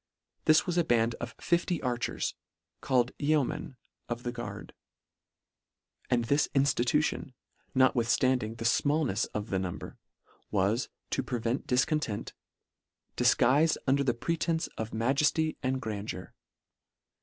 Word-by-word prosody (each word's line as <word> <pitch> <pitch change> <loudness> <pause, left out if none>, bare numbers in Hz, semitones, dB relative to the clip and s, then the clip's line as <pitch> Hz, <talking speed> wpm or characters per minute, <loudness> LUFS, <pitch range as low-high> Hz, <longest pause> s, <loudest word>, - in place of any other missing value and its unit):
This 155 0 +5
was 175 -1 0
a - - +4
band 115 -3 +2
of 120 +1 -6
50 170 -1 +1
archers, 125 -2 -1 0.5
called 125 -2 +2
yeomen 145 -3 0 0.3
of 120 0 -3
the 120 - -2
guard: 120 -1 -7 1.4
And 120 -2 +2
this 140 +5 +2
inftitution, 135 0 +1 0.4
notwithstanding 125 -2 +2
the 115 0 -6
fmallnefs 140 -3 +2
of 105 0 -3
the 95 - +1
number, 90 -2 -5 0.5
was, 105 +4 +1 0.2
to - - +1
prevent 120 0 -2
difcontent, 125 -3 0
f - - -21 0.4
" - - -52
difguifed 145 +7 +4
under 140 +1 +3
the 120 -3 +1
pretence 165 +5 -1
of 110 0 -4
majefly 140 +7 +1
and 130 0 0
grandeur." 105 -5 -5
125 Hz, 120 wpm, -30 LUFS, 115-145 Hz, 1.4 s, This